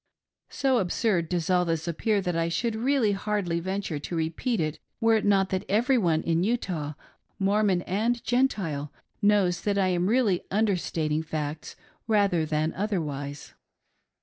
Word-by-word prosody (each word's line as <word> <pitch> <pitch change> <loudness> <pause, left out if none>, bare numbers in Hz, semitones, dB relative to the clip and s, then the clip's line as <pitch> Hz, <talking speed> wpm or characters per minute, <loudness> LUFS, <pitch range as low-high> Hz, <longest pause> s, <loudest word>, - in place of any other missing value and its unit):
So 260 -1 +1
absurd 180 -2 0
does 175 -3 -1
all 180 -1 +4
this 165 -1 -2
appear 200 +5 0
that 180 -2 -2
I 165 0 0
should 220 +7 -1
really 240 -1 +2
hardly 195 -4 -1
venture 190 -3 -3
to 170 - -5
repeat 165 +9 -1
it 155 -1 -2 0.2
were 225 0 +4
it 215 - -2
not 195 -2 +3
that 190 -1 -1
every 235 +7 +3
one 165 -6 +1
in 165 +1 +1
Utah 180 -9 -1 0.3
— - - -45
Mormon 200 -3 +2
and 230 +5 -1
Gentile 190 - 0 0.2
— - - -45
knows 180 -4 +2
that 205 +1 0
I 190 -2 +2
am 180 0 +1
really 215 -5 +2
understating 170 -7 0
facts 155 -1 -5 0.3
rather 200 -7 +2
than 155 +1 0
otherwise. 150 -8 -4
185 Hz, 160 wpm, -27 LUFS, 165-210 Hz, 0.3 s, all